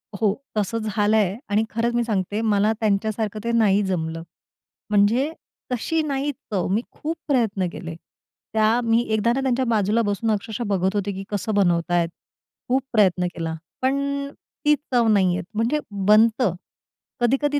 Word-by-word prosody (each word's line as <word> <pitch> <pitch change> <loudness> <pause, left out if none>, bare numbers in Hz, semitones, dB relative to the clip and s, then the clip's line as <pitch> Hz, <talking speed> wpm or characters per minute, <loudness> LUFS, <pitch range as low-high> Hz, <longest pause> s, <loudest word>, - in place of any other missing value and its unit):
हो, 205 0 +1 0.2
तसं 210 +2 0
झालं 210 +1 +2
आहे 200 -2 +2
आणि 210 +2 +2
खरंच 235 +1 -1
मी 240 - +2
सांगते 210 -1 -1
मला 215 -1 +2
त्यांच्यासारखं 215 0 0
ते 235 - -1
नाही 210 -3 +3
जमलं. 165 -3 -2 0.7
म्हणजे 215 +8 +3 0.4
तशी 320 +7 0
नाही 285 -1 -1
चव. 210 - -4
मी 215 +4 +2
खूप 320 +2 -4
प्रयत्न 220 - +1
केले. 165 -1 -7 0.6
त्या 220 +2 +3
मी 230 0 +3
एकदा 220 +2 +2
ना 270 - -1
त्यांच्या 260 -1 +1
बाजूला 220 -1 +2
बसून 220 +1 0
अक्षरशः 215 +2 -2
बघत 190 0 0
होते, 200 0 -1
की 195 0 -6
कसं 205 +1 -2
बनवतायेत? 175 -2 +2 0.6
खूप 265 +2 +3
प्रयत्न 185 -4 +3
केला. 165 -1 -3 0.3
पण 280 +1 0 0.4
ती 300 0 +6 0.2
चव 235 -2 +4
नाही 190 -4 +3
येत. - - -3
म्हणजे 235 +7 +1
बनतं. 210 +1 +3 0.7
कधी-कधी 285 +4 +2
215 Hz, 155 wpm, -23 LUFS, 195-240 Hz, 0.7 s, ती